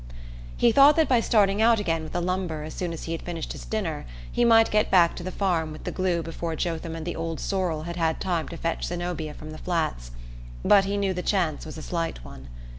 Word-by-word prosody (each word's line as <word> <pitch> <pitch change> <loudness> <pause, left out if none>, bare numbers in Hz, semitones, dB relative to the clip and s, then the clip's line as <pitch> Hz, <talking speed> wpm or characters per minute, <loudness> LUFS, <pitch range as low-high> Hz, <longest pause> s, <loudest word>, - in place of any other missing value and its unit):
He 235 - +4
thought 280 +4 +7
that 320 -1 +3
by 250 -3 +4
starting 210 -3 +3
out 230 0 +5
again 165 -5 0
with 155 - -8
the 175 - -1
lumber 180 -3 -2
as 155 - -7
soon 180 -2 -3
as 165 - -6
he 165 - -5
had 165 - -3
finished 170 -2 -5
his - - -8
dinner 180 - -3 0.2
he - - +1
might 225 -1 +5
get 210 0 +2
back 175 -3 +5
to - - -6
the 180 - -4
farm 175 -5 0
with 155 - -9
the - - -3
glue 180 -3 0
before 165 0 -4
Jotham 165 0 -3
and 160 -1 -6
the 175 - -3
old 165 0 -4
sorrel 180 -6 -1
had 170 +1 -6
had 160 -2 0
time 175 -4 -1
to 170 - -7
fetch 165 0 -2
Zenobia 175 -3 -4
from 155 0 -9
the 155 - -9
Flats; 160 - -2 0.6
but 195 -1 +6
he 200 +1 -1
knew 195 -1 0
the 180 - -3
chance 175 -7 0
was 155 - -8
a 155 - -7
slight 165 - -3
one. 65 0 -11
170 Hz, 245 wpm, -26 LUFS, 160-195 Hz, 0.6 s, thought